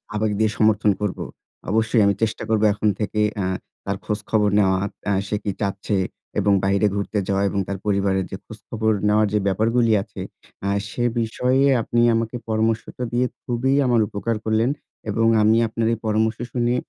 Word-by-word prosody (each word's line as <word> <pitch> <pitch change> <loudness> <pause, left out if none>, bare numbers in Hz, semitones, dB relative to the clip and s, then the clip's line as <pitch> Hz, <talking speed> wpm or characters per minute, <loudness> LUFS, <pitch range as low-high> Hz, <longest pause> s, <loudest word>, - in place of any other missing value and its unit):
আবেগ 105 0 0
দিয়ে 110 -1 +3
সমর্থন 110 -1 +3
করব। 105 -3 -2 0.5
অবশ্যই 110 +1 +2
আমি 100 0 +3
চেষ্টা 110 0 -1
করব 110 -1 +2
এখন 105 +1 +1
থেকে 105 0 -1 0.2
আ - - -1 0.4
তার 100 0 -2
খোঁজখবর 105 0 0
নেওয়া, 95 -1 +3 0.3
আ - - +3
সে 105 - -1
কি 100 - -1
চাচ্ছে 100 0 -1 0.4
এবং 100 0 +3
বাইরে 100 +2 +2
ঘুরতে 100 +1 -1
যাওয়া 100 0 +1
এবং 100 - -2
তার 100 - -3
পরিবারের 95 -2 +1
যে 95 - -4
খোঁজখবর 110 0 -3 0.2
নেওয়ার 105 +1 +3
যে 105 - +3
ব্যাপারগুলি 115 +4 +2
আছে। 100 -2 -10 0.5
আ - - +1 0.2
সে 120 - -3 0.2
বিষয়ে 125 +4 +1 0.2
আপনি 120 +1 0
আমাকে 115 +1 -2
পরামর্শটা 110 +2 -1
দিয়ে 125 +1 +2 0.2
খুবই 125 +3 0
আমার 120 -2 +3
উপকার 110 +3 -2
করলেন 110 +2 +2 0.4
এবং 115 +2 +2
আমি 110 +1 +4
আপনার 115 0 -1
এই 115 - -2
পরামর্শ 110 +1 +1
শুনে 120 0 +1
110 Hz, 170 wpm, -22 LUFS, 100-115 Hz, 0.5 s, আমি